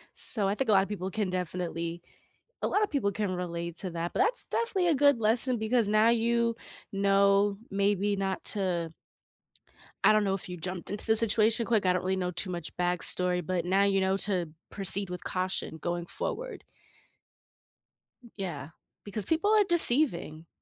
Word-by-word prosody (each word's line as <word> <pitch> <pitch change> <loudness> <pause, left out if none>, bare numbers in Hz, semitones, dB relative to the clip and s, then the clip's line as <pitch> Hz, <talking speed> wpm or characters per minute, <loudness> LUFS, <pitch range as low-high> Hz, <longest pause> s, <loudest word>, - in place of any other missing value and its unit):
So 205 -4 +1
I 200 - 0
think 265 +3 -3
a - - +4
lotta 195 -1 +4
people 190 -2 -5
can 210 -2 -2
definitely 175 -2 -4 0.6
a - - +2
lotta 420 +1 +1
people 275 - -1
can 195 -2 -3
relate 170 -1 -5
to 185 - -3
that, 170 +1 -4
but - - -3
that's 455 +5 0
definitely 390 -7 -1
a 320 - +3
good 285 -2 +3
lesson 235 +3 +2
because 220 -1 0
now 215 +2 +4
you 235 0 +1 0.4
know, 200 0 +2
maybe 200 0 0
not 195 -1 -3
to 175 -5 +1 1.1
I - - +7
don't 215 0 +3
know 195 -1 0
if 190 -1 -4
you 180 - -7
jumped 180 +1 -5
into 205 - -1
the 220 -1 +3
situation 225 +1 +3
quick, 220 -4 +1
I 180 - +3
don't 180 - -1
really 190 +1 -1
know 180 -1 -2
too 180 +2 0
much 170 -3 -6
backstory, 180 0 +1
but 175 0 -2
now 195 +3 +2
you 195 -1 +1
know 190 +1 0
to 185 -5 +1 0.2
proceed 195 0 +1
with 180 0 -7
caution 185 -3 -2
going 175 0 -3
forward. - - -6 1.7
Yeah, 160 -8 -5 0.4
because 205 0 -3
people 325 +6 0
are 425 -1 +5
deceiving 240 - +3
195 Hz, 175 wpm, -28 LUFS, 180-225 Hz, 1.7 s, I